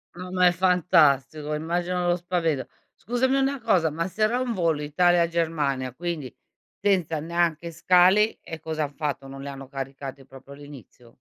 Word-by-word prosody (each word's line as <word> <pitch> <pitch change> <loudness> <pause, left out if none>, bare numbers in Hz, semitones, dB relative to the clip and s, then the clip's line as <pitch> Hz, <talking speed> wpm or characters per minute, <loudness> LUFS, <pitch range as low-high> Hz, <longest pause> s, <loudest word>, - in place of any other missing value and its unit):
No 180 +1 -8
ma 180 -1 +3
è 175 - +6
fantastico, 155 -5 +2
immagino 175 +3 -2
lo 175 - +3
spavento. 170 -5 -1 0.3
Scusami 245 +4 0
una 275 0 +1
cosa, 175 -8 +2
ma 165 +4 -3
se 210 +3 -8
era 235 +4 +2
un 250 -2 -1
volo 165 -5 0
Italia-Germania, 165 -5 +1
quindi 160 -5 -5 0.5
senza 180 -6 +1
neanche 170 0 -1
scali, 185 +5 +4
e 160 -1 -8
cosa 160 -1 -3
han 145 0 -5
fatto, 145 -2 -3
non 135 0 -9
li 140 - -7
hanno 135 -1 -8
caricati 135 0 -7
proprio 135 +1 -15
all'inizio? 140 -4 -13
165 Hz, 160 wpm, -25 LUFS, 145-180 Hz, 0.5 s, è